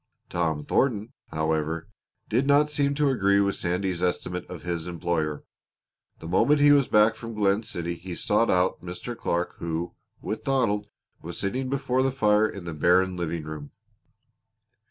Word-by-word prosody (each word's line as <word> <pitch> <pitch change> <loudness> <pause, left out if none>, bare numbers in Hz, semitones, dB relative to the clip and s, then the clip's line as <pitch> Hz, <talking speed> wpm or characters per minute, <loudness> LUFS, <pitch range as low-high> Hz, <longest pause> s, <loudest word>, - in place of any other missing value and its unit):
Tom 80 -4 0
Thornton, 110 - 0
however, 80 +1 -1 0.4
did 125 +5 +1
not 145 +1 +4
seem 140 -1 +1
to 145 -1 +2
agree 100 -5 +3
with 100 -1 +2
Sandy's 90 0 -1
estimate 90 0 -2
of 90 -3 -8
his 85 -1 -3
employer. 85 -3 -2 0.7
The 80 - -9
moment 145 - +3
he 145 0 +6
was 140 -2 +5
back 105 +1 +5
from 115 -1 -8
Glen 100 0 +2
City 85 -5 -4
he 85 +1 -7
sought 105 +6 +1
out 90 0 +2
Mr. 90 +7 -6
Clark 85 -5 -2
who, 85 +1 -3 0.3
with 110 - -4
Donald, 115 -7 +1 0.3
was 85 +1 -6
sitting 130 +6 -2
before 130 -1 0
the 135 0 +2
fire 105 -4 +3
in 95 -3 -8
the 85 - -4
barren 90 +4 +3
living 85 -2 -3
room. 75 -2 -8
95 Hz, 160 wpm, -26 LUFS, 85-120 Hz, 0.7 s, he